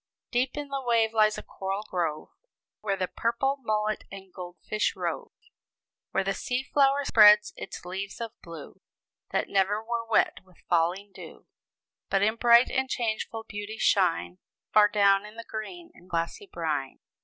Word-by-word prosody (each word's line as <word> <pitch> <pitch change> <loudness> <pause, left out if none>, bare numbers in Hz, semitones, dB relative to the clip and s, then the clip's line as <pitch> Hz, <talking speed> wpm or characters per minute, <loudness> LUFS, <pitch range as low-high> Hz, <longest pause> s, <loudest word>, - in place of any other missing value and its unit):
"Deep 250 +3 0
in 290 -1 -5
the 275 -1 -3
wave 230 -3 +2
lies 215 -1 +3
a - - -7
coral 195 +2 -4
grove, 165 -7 -3 0.5
Where 200 -2 -2
the 185 -1 -1
purple 255 +7 -1
mullet 215 -2 -1
and 195 -1 -11
goldfish 185 +3 -3
rove; - - -3 0.8
Where - - 0
the 195 +1 -1
seaflower 275 +5 +1
spreads 210 -3 +7
its - - -8
leaves 190 +4 -5
of 230 -1 -4
blue, 165 -4 -11 0.5
That - - -1
never 200 +2 +1
were 235 0 -2
wet 225 - +2
with 185 -2 -24
falling 175 +4 +1
dew; - - -12 0.6
But 195 0 +2
in 220 +2 +1
bright 235 +1 +6
and 265 -1 0
changeful 225 -2 -2
beauty, 205 0 -7
shine 180 -3 +1 0.3
Far 210 -1 +7
down 200 -1 +3
in 210 +1 -12
the 230 0 -9
green 335 +11 -7
and 180 - -19
glassy 170 - -3
brine." 150 -5 -3
210 Hz, 155 wpm, -27 LUFS, 190-235 Hz, 0.8 s, spreads